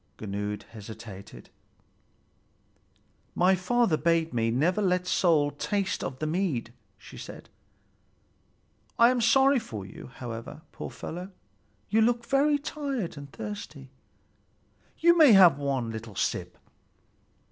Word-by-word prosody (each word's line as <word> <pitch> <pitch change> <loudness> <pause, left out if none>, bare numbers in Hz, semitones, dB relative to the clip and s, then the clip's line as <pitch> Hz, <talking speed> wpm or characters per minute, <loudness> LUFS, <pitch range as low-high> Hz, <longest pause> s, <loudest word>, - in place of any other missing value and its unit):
Gunnlöd 105 0 -4
hesitated. 110 -2 -11 1.8
"My 180 +2 +4
father 190 -1 +1
bade 165 -1 +1
me 115 -1 +1
never 160 - +1
let 180 -2 +1
soul 160 -5 +2
taste 195 +7 -2
of 130 - -4
the 155 - -3
mead," 155 - -2 0.2
she - - -13
said - - -10 1.5
"I 235 +1 +6
am 250 -1 0
sorry 270 +4 +4
for 110 - -7
you, 95 - -11
however, 120 +5 -7
poor - - -7
fellow. 180 +3 -7 0.6
You 220 - +4
look 235 +1 +2
very 285 +4 +3
tired 280 - -4
and 140 -1 -10
thirsty. 120 +5 -8 1.1
You 340 +1 +5
may 310 -8 +7
have 175 -7 +7
one 135 -5 -1
little 110 -2 -8
sip." - - -2
165 Hz, 120 wpm, -27 LUFS, -, 1.8 s, may